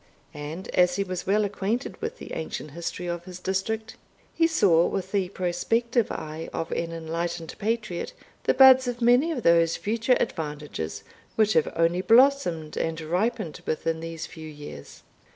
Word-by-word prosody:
And 150 +5 -6
as 180 0 +3
he 200 - 0
was 185 -2 -5
well 210 +2 +3
acquainted 205 - -3
with 455 +2 -4
the - - -9
ancient 155 -2 -5
history 170 +3 -5
of 175 0 -4
his 180 -1 -8
district, 205 +4 -2 0.4
he 330 - +3
saw 175 - +4
with 190 -1 -3
the 195 -3 0
prospective 225 +6 0
eye 155 +1 -5
of 165 - -4
an 165 0 -2
enlightened 165 +1 -4
patriot, 215 - -2 0.3
the - - +3
buds 260 -1 +8
of 245 -1 -3
many 245 +7 +4
of 255 -8 -3
those 170 -1 +4
future 230 +4 +1
advantages 150 - -4 0.3
which 215 -1 +3
have 160 - +2
only 170 +2 +2
blossomed 225 - +3
and 165 0 -1
ripened 180 +2 -2
within 160 +1 -1
these 165 0 -6
few 160 -1 -10
years. 145 - -10
180 Hz, 160 wpm, -26 LUFS, 165-225 Hz, 0.4 s, buds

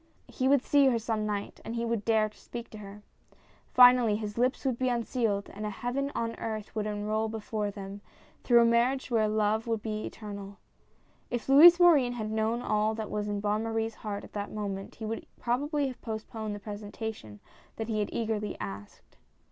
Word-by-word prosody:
He 260 - -1
would 275 -1 +4
see 285 -1 +4
her 245 -3 +3
some 220 -1 -2
night 205 -1 -4
and 230 - -5
he 235 0 -1
would 230 -3 -1
dare 220 -1 +3
to 215 - -15
speak 235 0 -9
to 215 - -9
her. 205 0 -10 0.7
Finally, 245 -3 +7
his 210 -1 -4
lips 255 +4 0
would 255 -3 0
be 255 -1 +1
unsealed 230 -4 -1
and 210 - -7
a 210 - -1
Heaven 250 +6 -2
on 230 0 -1
earth 215 -2 -5
would 215 -1 -1
unroll 215 +1 -1
before 215 -1 -3
them, 200 0 -8 0.4
through 240 -1 +6
a - - +4
marriage 245 +3 +2
where 220 -2 +3
love 215 +1 +1
would 225 -2 -1
be 215 -1 -3
Eternal. 200 -2 -8 0.7
If 240 -1 -3
Louis 330 +6 +9
Morin 295 -9 +5
had 215 -3 -4
known 220 +2 0
all 215 +1 +1
that 220 -1 -5
was 210 0 -2
in 205 -1 -2
Bonne 210 +1 0
Marie's 225 0 -2
heart, 205 -1 -4
at - - -13
that 205 -1 -4
moment, 200 -2 -5
he 220 - -7
would 225 +1 -4
probably 285 +5 0
have 255 - -10
postponed 220 -1 -5
the - - -7
presentation 205 - -7 0.4
that 225 - -4
he 220 -2 -1
had 205 - -1
eagerly 215 -2 -2
asked. 100 +1 -9
220 Hz, 195 wpm, -29 LUFS, 210-235 Hz, 0.7 s, Louis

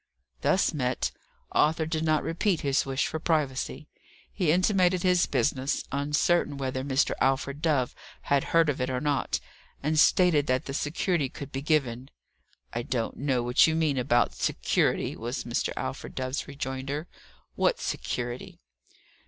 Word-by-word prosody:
Thus 185 - +2
met, 130 -4 -1 0.4
Arthur 160 +1 +2
did 160 0 -2
not 155 -1 +2
repeat 170 +1 0
his 140 -1 +1
wish 135 0 0
for 160 - -3
privacy. 150 -2 -1 0.5
He 175 -7 +1
intimated 185 0 +3
his 180 -1 +3
business, 135 0 0
uncertain 145 +2 +1
whether 130 -1 -2
Mr. 135 +1 +1
Alfred 135 +2 +1
Dove 145 -6 +1 0.3
had 140 -1 +1
heard 165 -1 +3
of 140 -3 -1
it 125 - 0
or 130 -1 -1
not; 145 0 0 0.4
and 155 +1 +2
stated 160 -4 +4
that 130 0 +1
the 135 - -5
security 150 0 0
could 140 0 -9
be 135 - -3
given. 135 -4 0 0.6
"I 120 - -1
don't 120 -1 -2
know 130 -3 0
what 120 +5 +5
you 160 - +1
mean 155 -5 +1
about 120 -1 +2
'security,'" - - 0
was - - -4
Mr. - - -1
Alfred 65 - -5
Dove's 130 +1 -3
rejoinder. 140 +2 -4 0.5
"What - - +1
security?" 120 0 -4
145 Hz, 150 wpm, -27 LUFS, 130-160 Hz, 0.6 s, what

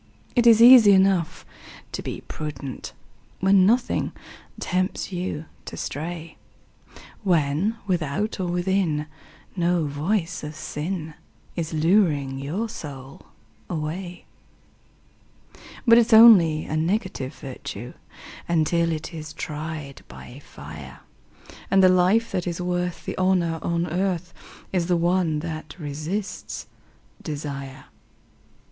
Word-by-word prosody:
It 240 -1 +4
is 230 0 +8
easy 240 -5 +9
enough 190 -4 +2 0.5
to - - -4
be - - -6
prudent 145 -4 -7 0.5
When 190 0 +5
nothing 240 +3 +1 0.5
tempts 185 +2 -1
you 175 -4 -4 0.2
to - - -8
stray, 165 +1 -5 0.8
When 175 +3 +1
without 185 +3 -1
or 185 - -1
within 175 -3 0 0.5
no 175 -2 +1
voice 165 +6 -2
of 150 +1 -6
sin 160 +1 -4 0.4
Is 165 -3 -3
luring 155 -5 +2
your 170 +12 -3
soul 140 - -9 0.4
away; 175 +2 -5 1.6
But 230 -1 +7
it's 235 0 +2
only 190 -9 +8
a 155 - -3
negative 170 - -1
virtue 125 -3 -8 0.6
Until 170 0 +2
it 160 +2 -5
is 155 -1 -7
tried 150 -2 -6
by 125 +3 -11
fire, 70 -3 -11 0.7
And 195 -1 +4
the 185 - +7
life 185 +6 +3
that 180 -2 -2
is 170 0 -3
worth 180 0 -2
the - - -4
honour 180 -3 +1
on 170 0 0
earth 180 0 -2 0.4
Is 175 -3 +1
the 180 -1 +2
one 170 -3 +1
that 155 -3 -6
resists 160 +6 -5 0.6
desire. 140 -3 -6
170 Hz, 115 wpm, -24 LUFS, 150-190 Hz, 1.6 s, easy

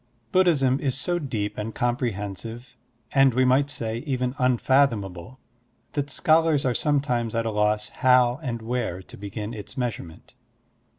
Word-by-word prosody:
BUDDHISM 145 -8 +3
is 135 -3 -1
so 175 +3 -1
deep 110 -10 -3
and 110 +1 -5
comprehensive 120 -1 -3 0.2
— 115 -1 -41
and, 135 -3 +4
we 130 0 +4
might 135 +3 +3
say, 115 -5 -3
even 125 -2 -2
unfathomable 125 -4 +1 0.3
— - - -42
that 145 -1 -2
scholars 155 +1 +3
are 125 - +2
sometimes 125 -6 0
at 115 0 0
a 115 - -1
loss 105 0 0
how 125 0 +3
and 120 -6 -4
where 115 -6 -3
to - - -14
begin 105 +2 -6
its 105 +3 -9
measurement. 105 -9 -5
125 Hz, 155 wpm, -25 LUFS, 110-135 Hz, 0.3 s, and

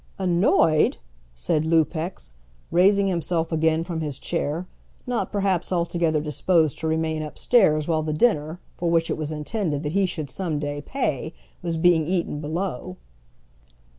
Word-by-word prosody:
"Annoyed!" 175 - +3 0.4
said - - 0
Lupex, 160 - 0 0.4
raising 195 +3 +4
himself 170 -2 -1
again 160 0 +2
from 170 -2 -4
his 150 -4 -3
chair, 160 +5 -2 0.4
not 245 -1 -2
perhaps 195 -4 0
altogether 170 -3 +1
disposed 155 +1 +1
to 160 - -2
remain 160 0 0
upstairs 155 0 +2
while 160 -2 +1
the 155 0 -2
dinner, 155 -2 +1
for 175 - -2
which 165 -1 +2
it - - 0
was 155 -1 -4
intended 150 0 -2
that 150 - -2
he 195 +2 +2
should 155 -6 -5
some 165 +1 -2
day 145 0 -3
pay, 155 - -3 0.3
was 170 -2 -2
being 165 -2 +3
eaten 175 -4 -1
below. 155 - -4
160 Hz, 145 wpm, -24 LUFS, 155-180 Hz, 0.4 s, raising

